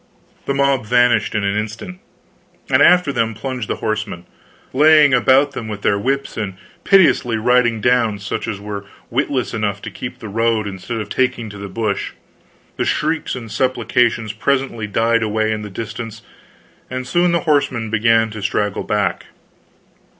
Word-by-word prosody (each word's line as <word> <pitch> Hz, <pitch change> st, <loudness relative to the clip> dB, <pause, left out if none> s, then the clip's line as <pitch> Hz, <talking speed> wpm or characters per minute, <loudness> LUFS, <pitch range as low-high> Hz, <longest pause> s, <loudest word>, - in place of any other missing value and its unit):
The 140 Hz, -, 0 dB
mob 140 Hz, -2 st, +2 dB
vanished 120 Hz, -3 st, +3 dB
in 110 Hz, -, 0 dB
an 100 Hz, 0 st, 0 dB
instant; 110 Hz, -, -5 dB, 0.7 s
and -, -, +4 dB
after 180 Hz, -5 st, +5 dB
them 115 Hz, -2 st, 0 dB
plunged 125 Hz, 0 st, -4 dB
the -, -, -1 dB
horsemen, 105 Hz, -5 st, -3 dB, 0.5 s
laying 150 Hz, 0 st, +6 dB
about 135 Hz, +3 st, +4 dB
them 115 Hz, -, -6 dB
with 105 Hz, -1 st, -6 dB
their 100 Hz, -, +2 dB
whips 135 Hz, +5 st, -2 dB
and 100 Hz, -4 st, -3 dB, 0.3 s
pitilessly 165 Hz, -, +4 dB
riding 120 Hz, -1 st, +2 dB
down 120 Hz, -3 st, +2 dB
such 100 Hz, 0 st, -4 dB
as 105 Hz, -3 st, -4 dB
were 100 Hz, 0 st, -6 dB, 0.3 s
witless 130 Hz, 0 st, -1 dB
enough 105 Hz, -3 st, -1 dB
to -, -, -6 dB
keep 125 Hz, -, -7 dB
the 110 Hz, -, -9 dB
road 115 Hz, +1 st, 0 dB
instead 100 Hz, +4 st, -5 dB
of 110 Hz, -, -5 dB
taking 120 Hz, -4 st, -1 dB
to 100 Hz, -, -10 dB
the 100 Hz, 0 st, -7 dB
bush. 105 Hz, 0 st, -2 dB, 0.6 s
The -, -, 0 dB
shrieks -, -, -1 dB
and 115 Hz, -4 st, -8 dB
supplications 120 Hz, -2 st, +1 dB
presently 125 Hz, -1 st, -1 dB
died 115 Hz, +3 st, +1 dB
away 110 Hz, 0 st, 0 dB
in 110 Hz, -1 st, -2 dB
the 105 Hz, -, -7 dB
distance, 115 Hz, +2 st, -7 dB, 0.7 s
and 130 Hz, 0 st, -4 dB
soon 175 Hz, +7 st, +2 dB
the 170 Hz, -, +1 dB
horsemen 140 Hz, -8 st, 0 dB
began 115 Hz, 0 st, +3 dB
to 105 Hz, 0 st, -7 dB
straggle 105 Hz, 0 st, -1 dB
back. 100 Hz, -4 st, -1 dB
115 Hz, 165 wpm, -19 LUFS, 105-130 Hz, 0.7 s, laying